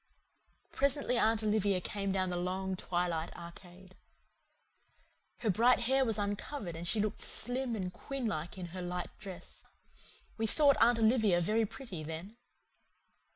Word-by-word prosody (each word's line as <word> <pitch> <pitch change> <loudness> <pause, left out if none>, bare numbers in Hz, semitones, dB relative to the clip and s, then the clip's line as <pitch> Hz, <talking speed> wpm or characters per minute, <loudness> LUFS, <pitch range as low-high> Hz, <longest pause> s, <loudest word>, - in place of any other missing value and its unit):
Presently 280 -2 +1
Aunt 220 0 +3
Olivia 205 -3 +2
came 195 +2 -2
down 185 -1 0
the - - -1
long 190 +1 -2
twilight 175 -2 -1
arcade. 180 +2 -12 1.5
Her 220 -3 +2
bright 235 +7 +4
hair 265 +3 +3
was 225 -4 0
uncovered 205 - -3
and 170 +1 -5
she 215 - +1
looked 210 0 -1
slim 245 0 +1
and 185 -3 -3
queen 275 +3 -5
like 170 -4 -3
in 180 -2 -6
her 185 - -5
light 180 0 -4
dress. 195 -4 -10 0.8
We 225 - +1
thought 285 +4 +5
Aunt 240 0 +6
Olivia 220 -5 +4
very 215 +5 +2
pretty 225 -6 -7
then. 165 +7 -6
200 Hz, 145 wpm, -33 LUFS, 180-230 Hz, 1.5 s, Aunt